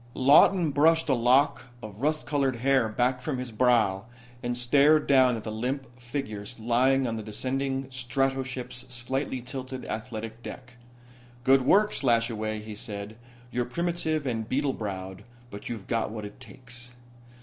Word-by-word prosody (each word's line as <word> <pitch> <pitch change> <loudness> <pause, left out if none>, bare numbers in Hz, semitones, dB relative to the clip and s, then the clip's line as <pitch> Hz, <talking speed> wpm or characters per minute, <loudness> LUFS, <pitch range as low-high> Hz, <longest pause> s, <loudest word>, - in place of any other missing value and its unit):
Lawton 150 +5 +5
brushed 160 +3 +3
a - - +5
lock 130 +4 +3 0.2
of 110 +1 -9
rust 155 +2 0
colored 140 -4 0
hair 130 -1 +2
back 125 +3 0
from 140 -1 -2
his 125 -1 -5
brow 110 -4 +2 0.4
and 120 0 -2
stared 145 +5 +4
down 130 -3 +5
at 110 - -6
the 110 - -5
limp 130 +5 -2
figure 120 -4 -5
lying 125 +4 +2
on 115 -2 -2
the - - -4
descending 135 +5 -2
stratoship's 130 0 -2
slightly 130 +2 -3
tilted 130 0 -6
athletic 110 +1 -6
deck. 125 +2 -9 0.7
"Good 135 +1 +5
work, 205 +11 +4
Slashaway," 115 -4 0
he 110 0 -7
said. 105 0 -7 0.4
"You're 125 0 -1
primitive 160 +1 -1
and 115 -4 -2
beetle 140 0 +1
browed, 95 -3 -6 0.3
but 100 - -8
you've 110 -5 -5
got 115 -2 -1
what 110 -1 -6
it 105 - -10
takes." 125 -1 -10
125 Hz, 150 wpm, -27 LUFS, 115-135 Hz, 0.7 s, Lawton